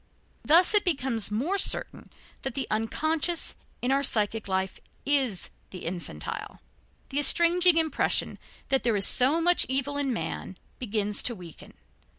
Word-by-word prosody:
Thus 340 +7 +5
it 420 - +4
becomes 265 - +1
more 285 - -2
certain - - +1 0.3
that 265 -3 -5
the 270 - -2
unconscious 315 +10 -1 0.3
in 250 - 0
our 275 +1 +2
psychic 220 -4 -1
life 190 0 -3 0.3
is 265 -9 -1 0.2
the 185 - -10
infantile. 165 - -7 0.5
The 280 - -1
estranging 340 +4 +4
impression 320 -1 0 0.3
that 270 - +1
there 235 -3 0
is 200 - +3
so 270 +6 +5
much 350 +1 +2
evil 275 +2 -1
in 280 -2 -1
man, 80 - -5 0.2
begins 210 -3 0
to 240 - -3
weaken. 175 -5 -14
260 Hz, 145 wpm, -26 LUFS, 210-315 Hz, 0.5 s, Thus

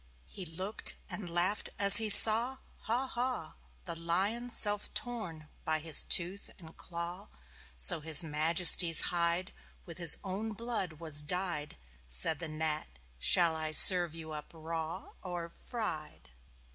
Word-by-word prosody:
He 185 - -10
looked 185 +7 -4 0.2
and 195 -5 -9
laughed 175 +5 -4
as 200 0 +8
he 220 -1 0
saw 230 +5 +7 0.3
Haw, 240 +4 -5
Haw! 245 -9 -8 0.3
The 170 -2 -7
Lion 190 +9 -5
self 205 -3 +1
torn 195 -11 -9 0.2
by 160 -2 -4
his 155 -1 0
tooth 185 +2 -1
and 165 -3 -16
claw, 175 +3 -9 0.5
So 175 -3 +4
His 160 +2 +3
Majesty's 165 +2 +2
hide 175 +1 -4 0.3
With 170 -1 -13
his 170 -3 +7
own 205 +3 -8
blood 225 -6 -8
was 155 -2 -1
dyed. 170 -1 -6 0.3
Said 65 - +2
the 165 -2 -7
Gnat: 155 0 -6 0.3
"Shall 170 - +2
I 155 -1 -7
serve 175 -1 +4
you 160 -1 -10
up 150 -1 -11
raw 165 +2 -10
Or 175 -2 -10 0.2
fried?" 165 - -10
175 Hz, 140 wpm, -27 LUFS, 160-200 Hz, 0.5 s, as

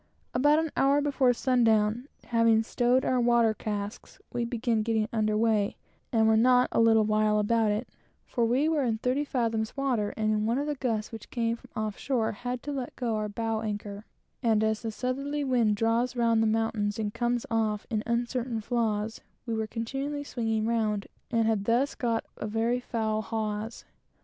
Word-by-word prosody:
About 290 +4 +4
an 320 -1 0
hour 275 +1 +4
before 280 -3 +2
sun 250 0 +1
down, 220 +3 +2 0.2
having 230 -1 +3
stowed 245 +3 +1
our 255 - +2
water 235 -2 +4
casks, 210 0 -5 0.2
we 240 -1 -1
commenced 230 -2 0
getting 220 -1 0
under 215 -1 +1
weigh, 215 -2 +2 0.4
and 220 -2 +3
were 220 - +5
not 250 +2 +4
a - - +1
little 225 -1 +5
while 215 0 +2
about 220 +1 +2
it; 210 +4 -1 0.4
for 240 - -1
we 250 +6 +2
were 315 -2 +2
in 230 -3 0
thirty 255 +5 0
fathoms 230 -4 -1
water, 245 -7 0
and 215 0 +1
in 215 0 0
one 235 +2 +1
of 285 - -1
the 295 - -1
gusts 230 -6 -2
which 225 -2 -9
came 230 -1 -1 0.2
off 215 -1 -3
shore 245 -5 0
had 245 +4 -5
let 270 -4 -4
go 235 -3 -1
our 215 0 -1
other 210 - -7
bow 225 0 -1
anchor; 205 -1 -5 0.4
and 220 -3 +2
as 220 0 0
the 225 -1 -3
southerly 275 +5 -2
wind 240 -6 +2
draws 230 +3 +1
round 230 -2 +3
the 225 - +3
mountains 215 -2 0
and 210 -2 -2
comes 240 0 -1
off 215 -2 0
in 215 -2 0
uncertain 235 0 -1
flaws, 220 -1 -1 0.2
we 230 - -3
were 220 -1 -1
continually 270 +6 -3
swinging 225 -5 -1
round, 215 -3 0 0.2
and 230 -2 +2
had 220 -3 +1
thus 245 +5 +2
got 230 -2 -1
a - - -4
very 225 +3 0
foul 220 -3 -1
hawse. 220 0 -4
230 Hz, 190 wpm, -28 LUFS, 215-245 Hz, 0.4 s, were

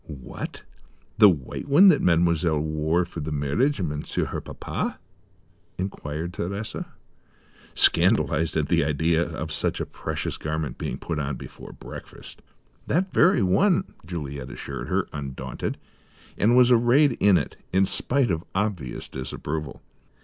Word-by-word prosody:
"What, 70 -5 -7 0.6
the 105 - +9
white 75 - -3
one 170 +8 +7
that 155 - +4
Mademoiselle 85 -2 +3
wore 80 +3 0
for 85 -1 -8
the 80 +1 -4
marriage 75 - +1
of 90 - 0
Monsieur, 75 -1 -2
her - - -4
papa?" - - -4 0.8
inquired 85 -3 -4
Thérèse, 100 +6 -4 0.9
scandalized 80 0 +3
at 75 -2 +1
the - - +3
idea 80 +3 +1
of 80 -2 -5
such - - -1
a - - -2
precious - - -4
garment 80 -1 -3
being - - -3
put 80 -3 -4
on 70 -1 -2
before - - -10
breakfast. - - -11 0.5
"That 185 +5 0
very 185 - +5
one," 165 - +2
Juliet 70 -5 -6
assured - - -6
her, - - 0
undaunted; 65 -2 -5 0.6
and 115 +4 +3
was 125 0 +6
arrayed 120 +3 +5
in 100 -2 +5
it, 75 - -3 0.2
in 95 +1 +4
spite 130 +3 +1
of 80 -1 -1
obvious 95 -10 -2
disapproval. 70 +2 -5
85 Hz, 140 wpm, -25 LUFS, 75-105 Hz, 0.9 s, the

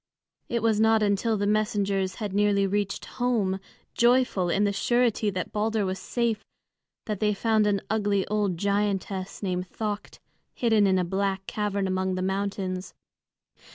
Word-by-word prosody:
It 235 -2 -1
was 220 -2 +3
not 220 0 +4
until 210 +2 +1
the 205 - 0
messengers 200 -2 0
had 210 -3 -4
nearly 205 -1 +3
reached 200 0 -1
home, 220 -7 0 0.3
joyful 240 -7 +3
in 195 +4 +2
the 205 -1 +1
surety 240 0 +2
that 185 -2 -4
Balder 215 0 0
was 190 0 -3
safe, 235 -3 -1 0.6
that 210 -3 -3
they 210 -1 +1
found 215 0 +2
an 200 -1 +1
ugly 205 -3 +1
old 205 -4 0
giantess 200 0 -1
named 180 -1 -2
Thökt 210 -2 -4 0.4
hidden 220 -4 +3
in 190 -1 +3
a 180 - +1
black 195 +1 -1
cavern 205 -2 -1
among 185 0 0
the 185 - -2
mountains. 190 -1 -3
205 Hz, 155 wpm, -26 LUFS, 190-215 Hz, 0.6 s, not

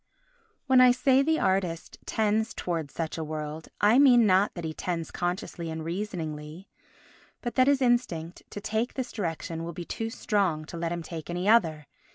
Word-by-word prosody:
When 260 -2 +6
I 255 - +8
say 255 +2 +4
the 315 +3 +2
artist 185 -3 -1
tends 220 +1 0
towards 165 -5 -3
such 165 0 -4
a - - -2
world, 155 0 -5
I 215 +5 +5
mean 245 -5 +7
not 195 +1 +3
that 175 - -6
he 160 - -3
tends 165 0 -3
consciously 175 -1 -3
and 160 0 -5
reasoningly 165 -3 -5 0.7
but 240 - -4
that 255 0 +4
his 280 -1 +3
instinct 210 -10 0
to - - -6
take 220 +4 -2
this 255 -2 -3
direction 165 -4 -4
will 170 +1 -5
be 175 +1 -6
too 225 +5 -4
strong 195 -9 0
to 170 - -8
let 165 0 -2
him 170 -1 -3
take 160 -1 -7
any 175 +2 -2
other. 165 -10 +3
180 Hz, 185 wpm, -27 LUFS, 165-225 Hz, 0.7 s, I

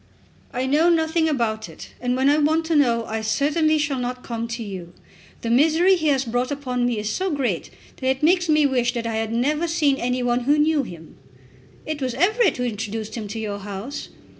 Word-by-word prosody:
"I 255 -1 -2
know 300 +6 +3
nothing 320 -1 +2
about 225 - -1
it, 160 - -12
and 250 0 0
when 265 +1 +2
I 295 +2 +4
want 315 +2 +2
to 325 0 0
know 235 -5 +3
I 220 0 -3
certainly 300 +8 +2
shall 295 -3 -1
not 250 0 -4
come 230 -1 -4
to 230 0 -5
you. 185 -4 -8 0.5
The 230 - -2
misery 320 +9 +4
he 315 -3 -1
has 270 -2 +2
brought 245 +2 -1
upon 255 -4 -1
me 240 -2 -1
is 210 0 -3
so 380 - -1
great 255 - -1 0.3
that 260 - -3
it 265 +2 -1
makes 350 +1 +3
me 305 -1 +4
wish 245 -3 +1
that 235 -1 -2
I 225 -1 -2
had 225 0 -2
never 295 +8 0
seen 305 -5 +2
any 250 0 -1
one 245 0 0
who 290 +2 +4
knew 300 0 +3
him." 170 -10 -10 0.7
"It 310 -2 -4
was 255 -2 -2
Everett 425 - +2
who 250 - -2
introduced 220 -1 -4
him 220 -3 -5
to 205 - -6
your 210 -2 -4
house." 205 +7 -6
255 Hz, 215 wpm, -23 LUFS, 230-305 Hz, 0.7 s, I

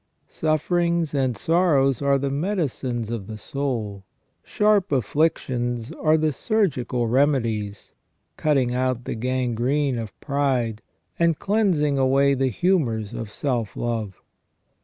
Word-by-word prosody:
Sufferings 170 +1 0
and 130 -5 0
sorrows 145 - +2
are 140 0 +3
the 135 0 -2
medicines 140 - -2
of 110 -5 -4
the 110 -1 -6
soul; 110 -6 -3 0.4
sharp 210 -2 +2
afflictions 125 -3 0
are 155 0 +2
the 155 -1 +1
surgical 135 - 0
remedies, 115 -5 0 0.4
cutting 135 -5 +1
out 125 -1 -1
the - - -3
gangrene 125 +2 0
of 110 -3 -7
pride, 130 -6 -1 0.4
and 170 -2 +3
cleansing 180 -9 +1
away 135 +1 +3
the 135 0 +1
humours 120 - 0
of 110 -3 -6
self 120 -6 -2
love. 110 -5 -3
135 Hz, 115 wpm, -23 LUFS, 120-155 Hz, 0.4 s, are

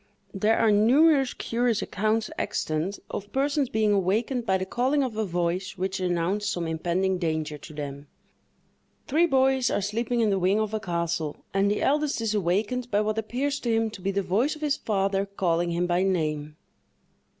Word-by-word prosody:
There 210 +3 +2
are 220 - +4
numerous 270 +6 +4
curious 235 -2 0
accounts 215 +2 -1
extant 160 +6 -2
of 205 +1 -6
persons 280 0 +1
being 215 -1 +2
awakened 220 +6 0
by 190 - +3
the 185 - -3
calling 260 +8 +1
of 250 -4 -3
a 220 - 0
voice 180 +1 -2
which 190 +1 -2
announced 185 +3 0
some 175 -1 -2
impending 175 +3 0
danger 155 -3 -2
to - - -11
them. 145 -1 -7 1.0
Three 325 +5 +3
boys 265 -3 +3
are - - 0
sleeping 230 +4 -1
in 215 -2 +2
the 195 - +1
wing 190 +4 +2
of 215 0 -2
a 220 - 0
castle, 170 -5 -3
and 195 +1 +2
the 205 - 0
eldest 295 -1 +1
is 225 -2 -1
awakened 210 +6 0
by 205 -1 +2
what 215 +1 -1
appears 270 +6 -2
to 235 - -1
him 225 -1 +1
to 195 - -10
be 195 - -1
the 200 0 0
voice 220 - +1
of 305 - -13
his 300 -1 +1
father 195 -1 0
calling 175 -3 0
him 170 +1 0
by 175 0 +1
name. 155 -5 -1
205 Hz, 185 wpm, -26 LUFS, 180-235 Hz, 1.0 s, are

